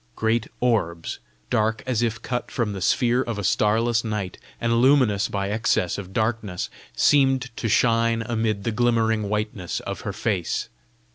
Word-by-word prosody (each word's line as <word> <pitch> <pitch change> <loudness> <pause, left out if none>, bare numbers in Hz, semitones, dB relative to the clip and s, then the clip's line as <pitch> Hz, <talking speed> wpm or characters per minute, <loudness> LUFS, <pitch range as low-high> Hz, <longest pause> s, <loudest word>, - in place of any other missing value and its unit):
Great 110 +1 0
orbs, 85 -9 0 0.3
dark 110 +1 +1
as 125 -3 0
if 115 -1 0
cut 125 -1 -3
from 115 -4 -1
the 95 - -6
sphere 120 +5 +2
of 115 -4 -3
a 105 - -3
starless 115 +4 +2
night, 105 -5 -4 0.2
and 115 0 +2
luminous 125 -7 +4
by 100 0 -2
excess 105 -5 +1
of 95 -2 -8
darkness, 110 -3 -2 0.2
seemed 130 - +3
to 115 - -2
shine 115 +1 +3
amid 110 -3 -1
the 115 - -1
glimmering 115 -2 +1
whiteness 105 -4 -2
of - - -5
her - - -3
face. - - -2
110 Hz, 155 wpm, -24 LUFS, 105-120 Hz, 0.3 s, luminous